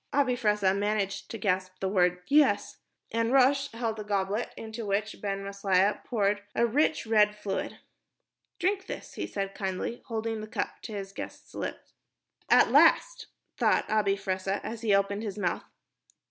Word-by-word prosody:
Abi 270 -3 +2
Fressah 210 -5 +2
managed 200 -1 -1
to 225 - -5
gasp 185 -3 0
the 190 - -1
word 180 -2 +2
"Yes," 290 -1 +3 0.3
and 230 +1 0
Rosh 275 +1 +4
held 225 -1 -3
a - - -4
goblet 205 +2 -1
into 225 +1 -6
which 205 +1 -1
Ben 195 -1 -2
Maslia 200 0 +1
poured 205 -3 +1
a 235 - +3
rich, 290 +5 +1
red 210 -2 +4
fluid. 200 -2 -3 0.8
"Drink 385 +1 0
this," - - -7
he - - -4
said 195 -1 -3
kindly, 195 +4 -3
holding 225 -1 -3
the 215 - -7
cup - - -4
to 220 - -6
his 195 -1 -6
guest's - - -9
lip. - - -5 0.6
"At - - +6
last," - - +4 0.3
thought - - +2
Abi 205 -2 +2
Fressah, 195 0 -2
as 225 0 -5
he 215 -4 +3
opened 200 +1 0
his 210 -3 -5
mouth. 180 -4 -1
210 Hz, 160 wpm, -28 LUFS, 195-230 Hz, 0.8 s, At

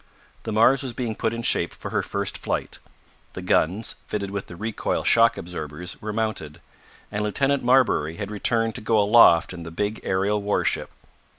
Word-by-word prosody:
The 110 - -3
Mars 115 +5 +4
was 130 -3 -4
being 120 -3 -3
put 110 +1 -1
in 115 0 -5
shape - - +1
for - - -8
her - - +1
first - - -3
flight. - - -3 0.5
The - - -7
guns, 95 +8 +1
fitted 100 -2 -3
with 100 -1 -5
the 85 - -10
recoil 110 +5 -2
shock 115 0 +4
absorbers, 85 0 -7
were 110 - -4
mounted, 105 -8 -3 0.5
and 105 - -2
Lieutenant 135 +6 0
Marbury 120 - +2
had 100 -1 -5
returned 115 +2 0
to 125 - -5
go 110 0 +2
aloft 100 -5 +6
in 85 - -8
the 85 - -7
big 105 +6 -3
aerial 100 +2 0
warship. 100 0 0
105 Hz, 180 wpm, -24 LUFS, 95-115 Hz, 0.5 s, aloft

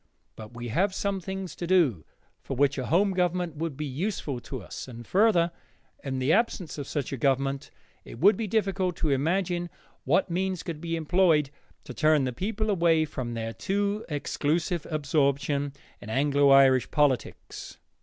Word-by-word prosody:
But 110 +1 -11
we 120 0 -6
have 185 - +1
some 200 -1 -1
things 190 0 -6
to 175 - -5
do 155 - +3 0.4
for 135 - -5
which 140 0 +2
a 130 - -3
home 195 +6 +3
government 180 -2 0
would 160 -3 -3
be 150 - -3
useful 145 - -3
to 130 +2 -7
us, 90 - -8
and 120 -2 -9
further, 185 - +3 0.5
in 135 -2 -3
the 130 +5 +2
absence 200 -8 0
of 140 - -5
such 145 -2 -3
a - - -3
government, 135 +2 0 0.3
it - - -11
would 200 - +5
be 225 -1 -3
difficult 195 -4 0
to 155 - -1
imagine 175 +5 0 0.3
what 145 +6 +2
means 185 0 -1
could 160 -3 -6
be 165 -1 -2
employed 160 -3 +2 0.3
to - - -9
turn 155 -2 +3
the 130 -1 -2
people 215 - -2
away 165 -4 +3
from 130 -5 -5
their 115 0 -4
too 200 - -1
exclusive 155 +3 -1
absorption 145 -2 0 0.3
in 105 - -9
Anglo 140 +3 +3
Irish 135 -2 +5
politics. 145 -6 -1
155 Hz, 170 wpm, -27 LUFS, 135-185 Hz, 0.5 s, would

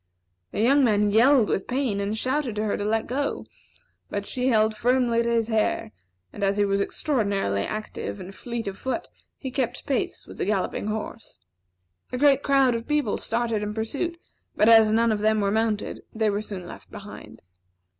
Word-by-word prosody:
The - - -2
young 275 +4 +5
man 210 -3 +3
yelled 240 +2 +5
with 190 - -1
pain, 250 -6 -1
and 205 +2 -2
shouted 260 -1 -1
to 210 - -1
her 210 - 0
to - - -3
let 220 +1 0
go; 280 +4 -2 0.6
but 205 0 -3
she 250 +4 -1
held 220 -3 +3
firmly 240 0 +2
to 235 - 0
his 230 -1 +1
hair, 220 - 0 0.4
and - - -8
as 195 +1 +1
he 205 - +3
was 200 0 +1
extraordinarily 200 - 0
active 215 -1 -5
and 185 +1 -8
fleet 235 +3 -5
of 195 -1 -5
foot, 265 +6 -3 0.3
he 265 - -6
kept 255 -2 -2
pace 270 -3 -2
with - - -12
the - - 0
galloping 205 0 -1
horse. 220 +2 -5 0.7
A 250 - -2
great 280 0 +4
crowd 275 -3 +3
of 230 0 -4
people 295 -7 0
started 230 -2 -1
in 210 0 -4
pursuit, 285 +10 -2 0.4
but 210 - +3
as 225 -1 +7
none 230 +1 +3
of 215 - 0
them 215 +1 +2
were 200 -1 +1
mounted, 220 -1 -1
they 220 -1 +1
were 205 +1 -1
soon 195 -4 -7
left - - -11
behind. 200 - -11
220 Hz, 190 wpm, -25 LUFS, 205-250 Hz, 0.7 s, as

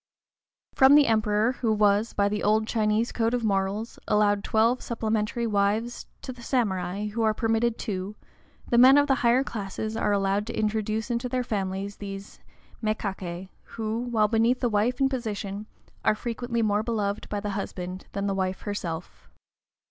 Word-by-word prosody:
From 270 +1 +7
the 295 -1 +7
Emperor, 215 0 +2
who 230 -3 +2
was, 210 +1 +2
by 200 0 +2
the 210 +1 -2
old 215 +1 +2
Chinese 220 +1 +1
code 230 +1 0
of 240 - -2
morals, 200 +2 -1
allowed 205 -1 +2
twelve 230 +3 +2
supplementary 225 0 -1
wives, 215 +2 0 0.2
to 260 - -5
the 245 - -14
samurai, 205 -5 -1
who 225 +2 -3
are 220 -1 +2
permitted 225 +1 +1
two, 200 -1 -4 0.5
the 235 - +3
men 260 +3 +8
of 290 - +5
the 275 - +3
higher 240 +2 +4
classes 215 -1 -4
are 210 -2 0
allowed 200 +1 +1
to - - -5
introduce 215 +1 -1
into 240 +1 -1
their 255 0 0
families 200 -2 -3
these 195 0 -8 0.4
mékaké, 190 -4 -3 0.3
who, 220 0 -2
while 235 -3 +1
beneath 230 +3 +2
the 245 - +1
wife 225 +4 +1
in 270 - +4
position, 215 -5 -4 0.4
are - - +3
frequently 235 +1 -2
more 210 -1 +2
beloved 210 -3 -2
by 205 - -2
the 205 0 -3
husband 185 -2 -5
than 200 0 -2
the 200 - 0
wife 190 -1 -2
herself. 180 -5 -5
215 Hz, 170 wpm, -26 LUFS, 200-235 Hz, 0.5 s, men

